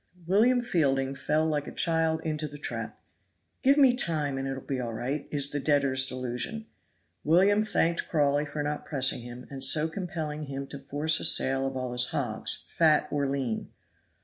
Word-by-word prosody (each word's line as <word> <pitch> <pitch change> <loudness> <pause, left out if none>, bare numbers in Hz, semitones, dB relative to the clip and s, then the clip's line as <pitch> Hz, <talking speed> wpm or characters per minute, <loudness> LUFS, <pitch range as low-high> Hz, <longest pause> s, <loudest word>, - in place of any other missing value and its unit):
William 225 +8 +3
Fielding 135 - 0
fell 155 +3 0
like 150 -2 -1
a - - -6
child 160 -1 +1
into 155 -1 -3
the 145 0 -10
trap. - - -6 0.6
"Give 275 +1 +4
me 265 -4 +5
time, 150 - -1
and 135 - -3
it 135 - -3
will 135 - -7
be 135 -2 -3
all 120 -2 -4
right," 135 +6 -4
is 140 -1 0
the 145 - -2
debtor's 135 -2 +2
delusion. 130 - -4 0.6
William 190 +7 +4
thanked 170 -5 0
Crawley 145 -1 +1
for 145 +1 -4
not 150 0 -3
pressing 135 -4 +2
him, 120 +1 -9
and 135 -1 -3
so 150 +4 +5
compelling 160 -4 -5
him 140 0 -5
to 140 - -8
force 145 +3 +1
a - - -5
sale 135 0 +3
of 135 0 -5
all 130 -1 -4
his 125 0 +4
hogs, 120 -6 -2
fat 155 -3 +2
or 140 -2 0
lean. 130 -5 -3
145 Hz, 185 wpm, -28 LUFS, 135-160 Hz, 0.6 s, me